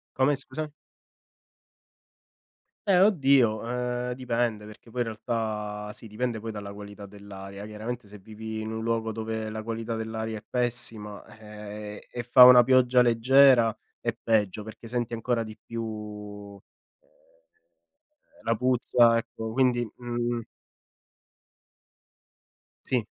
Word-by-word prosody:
Come 135 Hz, +2 st, +3 dB
scusa? 150 Hz, +3 st, -5 dB, 2.2 s
Eh 185 Hz, -1 st, +6 dB
oddio, 135 Hz, -, +4 dB
ehm, 125 Hz, 0 st, -2 dB
dipende, 120 Hz, -4 st, -1 dB
perché 105 Hz, +2 st, -14 dB
poi 125 Hz, +2 st, -3 dB
in 115 Hz, -, 0 dB
realtà 105 Hz, -2 st, -3 dB
sì 115 Hz, -, -10 dB
dipende 115 Hz, +1 st, -2 dB
poi 110 Hz, 0 st, -6 dB
dalla 100 Hz, -1 st, -6 dB
qualità 100 Hz, 0 st, -9 dB
dell'aria, 100 Hz, 0 st, -10 dB
chiaramente 110 Hz, +2 st, -6 dB
se 105 Hz, +1 st, -11 dB
vivi 110 Hz, +2 st, -7 dB
in 110 Hz, 0 st, -4 dB
un 110 Hz, 0 st, -4 dB
luogo 115 Hz, -1 st, -1 dB
dove 110 Hz, 0 st, -4 dB
la 110 Hz, 0 st, -5 dB
qualità 115 Hz, 0 st, -4 dB
dell'aria 110 Hz, 0 st, -4 dB
è -, -, -9 dB
pessima, 115 Hz, -4 st, -2 dB, 0.2 s
eh, 105 Hz, -1 st, -9 dB
e 120 Hz, -, -5 dB
fa 125 Hz, +2 st, +9 dB
una 125 Hz, -1 st, +9 dB
pioggia 125 Hz, 0 st, +5 dB
leggera 120 Hz, 0 st, +5 dB, 0.2 s
è 115 Hz, -1 st, -2 dB
peggio, 105 Hz, -3 st, 0 dB
perché 110 Hz, +1 st, -10 dB
senti 120 Hz, 0 st, -2 dB
ancora 115 Hz, 0 st, 0 dB
di 110 Hz, 0 st, -10 dB
più, 105 Hz, -3 st, -7 dB, 0.4 s
ehm, -, -, -33 dB, 1.3 s
la 115 Hz, 0 st, +1 dB
puzza, 120 Hz, -1 st, +4 dB
ecco 110 Hz, -1 st, -5 dB
quindi, 125 Hz, -1 st, +2 dB
mhmm 120 Hz, -1 st, -2 dB, 2.4 s
Sì. 125 Hz, -4 st, 0 dB
115 Hz, 125 wpm, -27 LUFS, 105-120 Hz, 2.4 s, fa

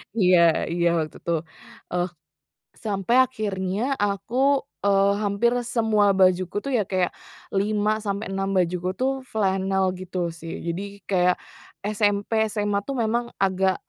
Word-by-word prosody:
Iya 185 Hz, -4 st, +5 dB, 0.4 s
iya 170 Hz, 0 st, +2 dB
waktu 155 Hz, -1 st, -3 dB
itu. 170 Hz, -, -3 dB, 0.6 s
Eh, 180 Hz, 0 st, +1 dB, 0.8 s
sampai 205 Hz, +2 st, 0 dB
akhirnya 200 Hz, -5 st, -3 dB, 0.2 s
aku, 200 Hz, +4 st, -2 dB, 0.5 s
eee, 200 Hz, 0 st, +4 dB
hampir 205 Hz, +3 st, +2 dB, 0.2 s
semua 220 Hz, -3 st, +3 dB
bajuku 185 Hz, 0 st, +3 dB
tuh 275 Hz, -, -3 dB
ya 210 Hz, -, +2 dB
kayak 185 Hz, -2 st, +1 dB, 0.5 s
5 210 Hz, +1 st, +1 dB
sampai 200 Hz, +2 st, -2 dB
6 195 Hz, 0 st, -1 dB
bajuku 180 Hz, 0 st, 0 dB
tuh 260 Hz, +1 st, +2 dB, 0.2 s
flanel 190 Hz, -2 st, +1 dB
gitu 185 Hz, 0 st, -7 dB, 0.2 s
sih, 165 Hz, +1 st, -7 dB
jadi 170 Hz, +3 st, -2 dB, 0.3 s
kayak 180 Hz, -1 st, +3 dB, 0.6 s
SMP, 205 Hz, 0 st, +1 dB, 0.2 s
SMA 205 Hz, -1 st, 0 dB
tuh 275 Hz, -, -2 dB
memang 235 Hz, +2 st, 0 dB, 0.2 s
agak 190 Hz, 0 st, +1 dB
195 Hz, 130 wpm, -24 LUFS, 185-210 Hz, 0.8 s, Iya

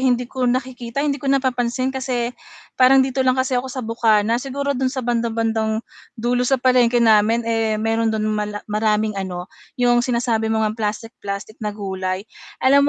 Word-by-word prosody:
hindi 250 Hz, -2 st, +2 dB
ko 250 Hz, 0 st, -1 dB
nakikita, 255 Hz, +1 st, -2 dB
hindi 280 Hz, -2 st, -1 dB
ko 275 Hz, -, -3 dB
napapansin 255 Hz, -1 st, 0 dB
kasi 250 Hz, -2 st, -2 dB, 0.5 s
parang 265 Hz, +1 st, +7 dB
dito 265 Hz, 0 st, -2 dB
lang 255 Hz, 0 st, +3 dB
kasi 260 Hz, +1 st, 0 dB
ako 260 Hz, -, -7 dB
sa 255 Hz, -2 st, -5 dB
bukana, 225 Hz, 0 st, +2 dB
siguro 280 Hz, +1 st, -2 dB
dun 260 Hz, -1 st, 0 dB
sa 260 Hz, -2 st, -4 dB
bandang-bandang 225 Hz, -2 st, 0 dB, 0.3 s
dulo 245 Hz, +2 st, 0 dB
sa 270 Hz, -, +4 dB
palengke 250 Hz, -1 st, +3 dB
namin, 225 Hz, 0 st, +4 dB
eh, 225 Hz, -1 st, 0 dB
meron 225 Hz, +1 st, 0 dB
dun 220 Hz, -1 st, -1 dB
mala 210 Hz, -1 st, -3 dB
maraming 215 Hz, 0 st, 0 dB
ano, 180 Hz, -2 st, -5 dB, 0.3 s
yung 245 Hz, -1 st, +3 dB
sinasabi 235 Hz, -2 st, 0 dB
mo 220 Hz, 0 st, +1 dB
ngang 215 Hz, +1 st, -3 dB
plastik 220 Hz, +2 st, -3 dB
plastik 200 Hz, +3 st, -6 dB
na 210 Hz, -1 st, -4 dB
gulay. 190 Hz, -1 st, -3 dB, 0.4 s
Alam 280 Hz, +2 st, +5 dB
235 Hz, 170 wpm, -21 LUFS, 220-255 Hz, 0.5 s, parang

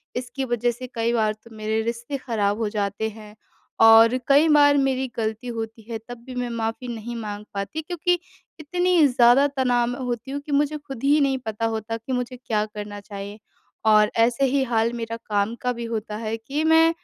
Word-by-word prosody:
इसकी 250 Hz, +2 st, -4 dB
वज़ह 240 Hz, -1 st, 0 dB
से 255 Hz, +2 st, -8 dB
कई 230 Hz, +1 st, 0 dB
बार 215 Hz, -2 st, +2 dB
तो 220 Hz, +1 st, -17 dB
मेरे 215 Hz, +1 st, -1 dB
रिश्ते 235 Hz, +4 st, -3 dB
ख़राब 215 Hz, -5 st, -1 dB
हो 225 Hz, -2 st, -1 dB
जाते 205 Hz, +1 st, -2 dB
हैं। 215 Hz, -1 st, -13 dB, 0.5 s
और 225 Hz, +2 st, +7 dB
कई 285 Hz, +3 st, +5 dB
बार 290 Hz, -1 st, +6 dB
मेरी 265 Hz, -1 st, +1 dB
गलती 220 Hz, +2 st, -3 dB
होती 225 Hz, 0 st, -5 dB
है 230 Hz, -, -3 dB
तब 245 Hz, 0 st, -7 dB
भी 260 Hz, -1 st, -8 dB
मैं 245 Hz, -1 st, -2 dB
माफी 230 Hz, +1 st, -3 dB
नहीं 235 Hz, 0 st, -5 dB
माँग 210 Hz, -2 st, -5 dB
पाती 200 Hz, +11 st, -4 dB
क्योंकि, 350 Hz, +2 st, 0 dB, 0.5 s
इतनी 355 Hz, +1 st, +2 dB
ज़्यादा 245 Hz, +1 st, +5 dB
तनाव 250 Hz, -4 st, +1 dB
में 245 Hz, +3 st, -4 dB
होती 245 Hz, +1 st, -4 dB
हूँ 285 Hz, -, -3 dB
कि 300 Hz, -, -7 dB
मुझे 295 Hz, +1 st, +1 dB
खुद 275 Hz, -5 st, -9 dB
ही 290 Hz, +2 st, +4 dB
नहीं 270 Hz, -1 st, +2 dB
पता 220 Hz, +1 st, -2 dB
होता 220 Hz, +1 st, -3 dB
कि 230 Hz, +3 st, -8 dB
मुझे 250 Hz, 0 st, -3 dB
क्या 220 Hz, -4 st, -1 dB
करना 210 Hz, -1 st, -7 dB
चाहिए? 200 Hz, +1 st, -8 dB, 0.5 s
और 215 Hz, -1 st, +5 dB
ऐसे 235 Hz, +4 st, +3 dB
ही 270 Hz, +1 st, +2 dB
हाल 230 Hz, -2 st, +1 dB
मेरा 230 Hz, -1 st, -4 dB
काम 205 Hz, +1 st, 0 dB
का 250 Hz, -, 0 dB
भी 235 Hz, 0 st, -6 dB
होता 215 Hz, -1 st, -3 dB
है 220 Hz, 0 st, -3 dB
कि 275 Hz, +7 st, -3 dB
मैं 320 Hz, +1 st, +5 dB
235 Hz, 200 wpm, -23 LUFS, 220-270 Hz, 0.5 s, और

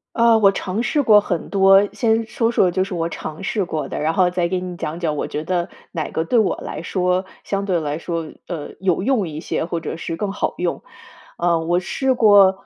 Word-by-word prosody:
啊， 230 Hz, -1 st, +5 dB
我 200 Hz, -2 st, +5 dB
尝 195 Hz, +3 st, -3 dB
试 290 Hz, +4 st, +1 dB
过 210 Hz, -3 st, +6 dB
很 175 Hz, -5 st, -3 dB
多。 195 Hz, 0 st, +5 dB
先 225 Hz, +1 st, +1 dB
说 230 Hz, +1 st, 0 dB
说 185 Hz, -6 st, +3 dB
就 185 Hz, +2 st, +1 dB
是 195 Hz, -1 st, -6 dB
我 165 Hz, 0 st, -1 dB
尝 155 Hz, +3 st, -7 dB
试 200 Hz, -1 st, -1 dB
过 150 Hz, -4 st, -3 dB
的， -, -, -5 dB
然 160 Hz, +2 st, 0 dB
后 180 Hz, 0 st, +3 dB
再 175 Hz, -1 st, 0 dB
给 185 Hz, 0 st, -1 dB
你 180 Hz, -1 st, -6 dB
讲 160 Hz, +3 st, -4 dB
讲， 155 Hz, -3 st, -1 dB
我 -, -, -2 dB
觉 150 Hz, -, -4 dB
得 175 Hz, 0 st, -1 dB, 0.2 s
哪 160 Hz, -3 st, -3 dB
个 160 Hz, -, -1 dB
对 230 Hz, +8 st, +2 dB
我 210 Hz, -, +2 dB
来 -, -, -6 dB
说， 180 Hz, +1 st, 0 dB, 0.2 s
相 200 Hz, 0 st, -2 dB
对 180 Hz, -4 st, +1 dB
来 150 Hz, 0 st, -3 dB
说， 165 Hz, -2 st, -4 dB, 0.2 s
呃， 160 Hz, -4 st, -5 dB
有 185 Hz, -1 st, 0 dB
用 235 Hz, -8 st, +1 dB
一 155 Hz, 0 st, -6 dB
些， 160 Hz, -, -2 dB
或 170 Hz, -1 st, -3 dB
者 165 Hz, -, -5 dB
是 165 Hz, -, -4 dB
更 195 Hz, +3 st, -3 dB
好 205 Hz, -, -2 dB
用。 -, -, -2 dB, 0.6 s
啊， 170 Hz, -1 st, +2 dB
我 175 Hz, +2 st, +1 dB
试 265 Hz, +8 st, 0 dB
过， 200 Hz, -4 st, +5 dB
185 Hz, 245 characters per minute, -21 LUFS, 165-205 Hz, 0.6 s, 过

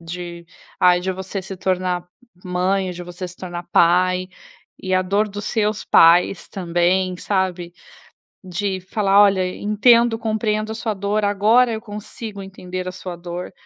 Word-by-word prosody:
de, 170 Hz, 0 st, -8 dB, 0.3 s
ai 180 Hz, -1 st, +5 dB
de 190 Hz, +1 st, -2 dB
você 190 Hz, +1 st, -5 dB
se 190 Hz, +1 st, -8 dB
tornar 180 Hz, -1 st, -1 dB, 0.4 s
mãe, 185 Hz, +1 st, 0 dB
de 180 Hz, 0 st, -8 dB
você 175 Hz, +1 st, -7 dB
se 180 Hz, -, -13 dB
tornar 175 Hz, -1 st, -7 dB
pai, 180 Hz, +2 st, +3 dB, 0.5 s
e 185 Hz, 0 st, -1 dB
a 185 Hz, -, +3 dB
dor 200 Hz, +3 st, 0 dB
dos 205 Hz, 0 st, -7 dB
seus 215 Hz, -1 st, -1 dB
pais 175 Hz, +3 st, +4 dB
também, 180 Hz, 0 st, 0 dB
sabe. 180 Hz, -3 st, -2 dB, 0.7 s
De 190 Hz, +1 st, -3 dB
falar: 195 Hz, +1 st, +3 dB
"Olha, 195 Hz, -2 st, +3 dB
en 180 Hz, -, -6 dB
entendo, 235 Hz, +1 st, +5 dB
compreendo 215 Hz, -1 st, -1 dB
a -, -, -4 dB
sua 220 Hz, -1 st, -2 dB
dor, 205 Hz, +1 st, -1 dB
agora 220 Hz, +4 st, +3 dB
eu 220 Hz, -, -4 dB
consigo 210 Hz, -1 st, -7 dB
entender 185 Hz, -1 st, -7 dB
a -, -, -3 dB
sua 180 Hz, -1 st, -7 dB
dor". 175 Hz, +1 st, -7 dB
185 Hz, 160 wpm, -21 LUFS, 180-205 Hz, 0.7 s, ai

